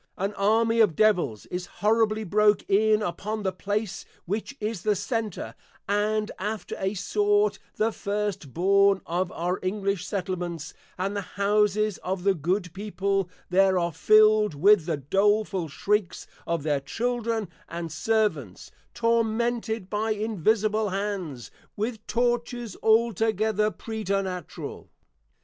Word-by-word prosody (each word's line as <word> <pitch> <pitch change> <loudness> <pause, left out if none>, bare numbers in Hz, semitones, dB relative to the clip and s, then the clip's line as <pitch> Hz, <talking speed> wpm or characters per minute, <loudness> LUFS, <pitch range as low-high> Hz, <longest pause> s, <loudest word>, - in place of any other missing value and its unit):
An 195 +2 -2
Army 225 +3 +2
of 210 -8 +4
Devils 175 - +2
is 180 0 -4 0.2
horribly 220 0 +3
broke 210 +1 +3
in 215 +2 +3
upon 210 +3 -3
the 190 - 0
place 200 +1 -3 0.2
which 215 +9 -4
is 215 -3 -3
the 210 +2 +1
Center, 215 0 -3 0.3
and 210 +1 0
after 210 -1 -4
a 190 +2 -1
sort, 205 +2 +1 0.2
the 220 +1 +1
First 205 -9 -3
born 195 +4 +3
of 175 +1 -1
our 175 +2 -2
English 195 -1 -1
Settlements: 180 -5 -4 0.2
and 195 +3 -2
the 200 - -1 0.2
Houses 210 0 +2
of 185 0 -3
the 200 0 +4
Good 175 +2 -1
People 195 -2 -1 0.2
there 190 0 +4
are 170 -2 0
fill'd 215 +2 +5
with 185 +2 +5
the 160 -3 0
doleful 195 +4 +1
Shrieks 195 +5 -1 0.2
of 170 -3 -1
their 145 -2 +1
Children 230 - -2 0.2
and 170 -1 -5
Servants, 160 - -1 0.2
Tormented 230 -2 0
by 215 +2 0
Invisible 215 +1 +1
Hands, 190 - -4 0.2
with 220 +1 -4
Tortures 240 -2 -1
altogether 220 -1 +2
preternatural. 195 -6 -4
205 Hz, 125 wpm, -26 LUFS, 185-215 Hz, 0.3 s, fill'd